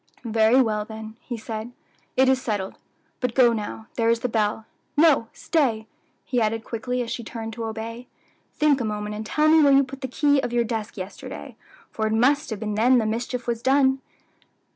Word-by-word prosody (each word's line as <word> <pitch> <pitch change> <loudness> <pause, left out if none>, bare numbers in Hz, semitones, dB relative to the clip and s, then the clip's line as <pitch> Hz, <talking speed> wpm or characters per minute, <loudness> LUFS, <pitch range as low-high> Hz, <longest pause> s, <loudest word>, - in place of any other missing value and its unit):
"Very 225 +2 +4
well, 215 -2 -1
then," 220 0 -9
he 240 - -6
said, 220 +1 -6 0.4
"it 260 0 +5
is 260 0 +3
settled. 205 -5 -2 0.5
But 250 -2 -2
go 245 -3 +6
now; 220 0 -5
there 230 -1 +2
is 230 0 +2
the - - 0
bell. 215 -1 0 0.3
No, 295 -7 +5
stay!" 245 -9 0 0.4
he 245 -2 0
added 220 +1 0
quickly, 245 +2 -3
as 235 - -6
she 235 - -4
turned 225 0 -6
to 230 0 -5
obey; 230 +2 -6 0.5
"think 295 -3 +3
a - - 0
moment 210 -1 -3
and 210 +1 -5
tell 300 +8 +1
me 315 0 +6
where 285 -2 +6
you 275 0 +6
put 270 +1 -9
the 260 - -2
key 285 +2 +2
of 245 - -2
your 240 0 +2
desk 220 -2 -4
yesterday, 185 +1 -8 0.4
for 220 -1 -1
it 215 - -1
must 280 +7 +3
have 220 -3 -4
been 210 -1 -3
then 240 +5 +4
the 225 - +2
mischief 235 +3 -2
was 235 -1 -2
done. 265 0 +3
230 Hz, 205 wpm, -24 LUFS, 220-260 Hz, 0.5 s, go